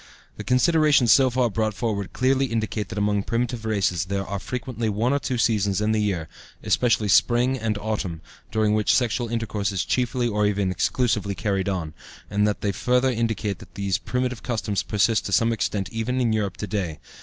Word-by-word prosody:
The - - -6
considerations 145 -2 +4
so 130 +2 +6
far 125 -2 +1
brought 110 -1 -1
forward 100 -4 -2
clearly 135 +1 +1
indicate 110 -3 -2
that 100 - -6
among 105 0 +1
primitive 115 +1 -2
races 95 -6 0
there 95 +1 -2
are 100 +1 -4
frequently 120 -1 -3
one 110 +6 +1
or 140 - +1
two 130 -2 -2
seasons 100 -5 +1
in 105 +1 +1
the 110 -1 +1
year 95 -6 -1 0.4
especially 115 -3 +2
spring 120 +5 +3
and 110 -4 -2
autumn 100 -6 -3 0.3
during 110 -1 +1
which 105 -1 +3
sexual 120 -1 0
intercourse 110 -3 -2
is 95 -3 -1
chiefly 125 -1 0
or 105 -2 +1
even 100 -2 0
exclusively 105 +1 0
carried 100 -1 -1
on, 85 -5 -3 0.4
and 105 0 +2
they 105 -1 -1
further 125 +6 +1
indicate 110 -4 -2
that 90 -5 -15
these 100 -2 -1
primitive 125 -1 -2
customs 110 -4 -1
persist 105 +1 +1
to - - -6
some 115 +3 +3
extent 105 -3 -2
even 115 +3 -2
in 120 -3 +1
Europe 105 -4 -1
to - - -4
day. 95 -8 -3
110 Hz, 190 wpm, -24 LUFS, 100-120 Hz, 0.4 s, so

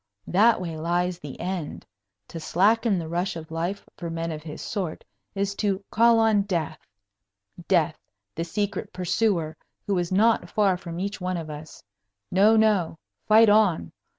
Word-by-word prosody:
That 220 +5 +4
way 170 -3 -5
lies 175 +2 -1
the 145 -5 -9
end. 180 -4 -4 0.4
To 165 - -7
slacken 210 +6 +2
the 165 -2 -4
rush 175 +3 -2
of 160 -1 -8
life, 170 +5 -3
for 170 -2 -5
men 165 0 -3
of 155 -1 -6
his 155 0 -8
sort, 180 -6 -4 0.3
is 200 0 -1
to 200 -2 -1
call 230 +1 +5
on 220 -2 +4
death 175 -6 -2 0.9
death, 170 -4 +2 0.3
the 165 - -3
secret 205 +3 -3
pursuer, 180 -3 0 0.3
who 200 - 0
is 175 0 -3
not 205 -2 +3
far 200 -2 +2
from 170 -1 -7
each 200 0 -4
one 180 0 -2
of 160 -2 -6
us. 150 +1 -10 0.5
No, 205 +4 +5
no! 205 -7 +2 0.3
Fight 220 +1 +7
on! 205 - +3
180 Hz, 160 wpm, -25 LUFS, 165-205 Hz, 0.9 s, Fight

